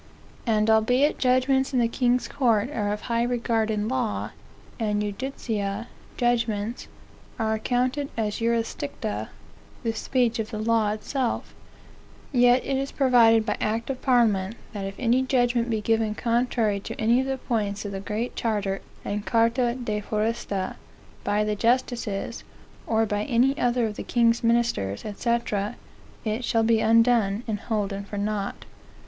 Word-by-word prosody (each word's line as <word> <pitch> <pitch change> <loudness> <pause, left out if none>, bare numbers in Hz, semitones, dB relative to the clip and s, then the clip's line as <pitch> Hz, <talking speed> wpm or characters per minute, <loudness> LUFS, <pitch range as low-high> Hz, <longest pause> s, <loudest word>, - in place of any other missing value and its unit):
"And 215 -1 +2
albeit 245 +7 +3
judgments 265 +2 +2
in 255 - +3
the 235 - +3
king's 245 +1 +1
courts 235 -2 +1
are 205 -5 -1
of 210 - -3
high 235 0 0
regard 235 -2 0
in 210 -1 -1
law, 250 -3 -1 0.5
and 210 -2 0
judicia 210 -1 -3 0.3
(judgments) 230 -2 0 0.5
are 220 -1 0
accounted 250 +5 0
as 215 -2 -1
jurisdicta, 225 - -2 0.5
(the 225 - 0
speech 235 0 0
of 220 -1 -2
the 220 - -5
law 220 -1 +2
itself,) 235 +4 -2 0.8
yet 245 -1 +4
it 270 - 0
is 275 +1 -2
provided 230 -5 +5
by 215 - 0
act 225 +4 -1
of 260 - -6
parliament, 225 -6 +2 0.2
that 200 -2 -4
if 195 - -7
any 250 +1 +2
judgment 245 -2 +1
be 220 -2 0
given 225 -1 +1
contrary 230 -3 +1
to - - -8
any 230 +3 +3
of 265 - -3
the 270 0 -1
points 210 -5 -2
of 205 - -4
the 195 - -4
Great 215 +4 -3
Charter 205 -4 -1 0.2
and 205 0 -2
Charta 235 +2 +2
de 215 -5 -3
Foresta, 210 -3 -2 0.5
by 205 +1 +1
the 210 0 -1
justices, 235 -1 -1 0.4
or 225 0 +2
by 205 -1 -1
any 260 +2 +3
other 245 -1 +2
of 210 -1 -4
the - - -4
king's 235 -1 +2
ministers, 230 - +1
&c., 235 - -3 1.0
it 220 +3 -1
shall 225 -1 +2
be 225 0 +3
undone, 230 -2 +3
and 210 -2 -2
holden 200 -3 -2
for 205 +1 -7
naught. 205 -1 -3
230 Hz, 155 wpm, -25 LUFS, 210-245 Hz, 1.0 s, provided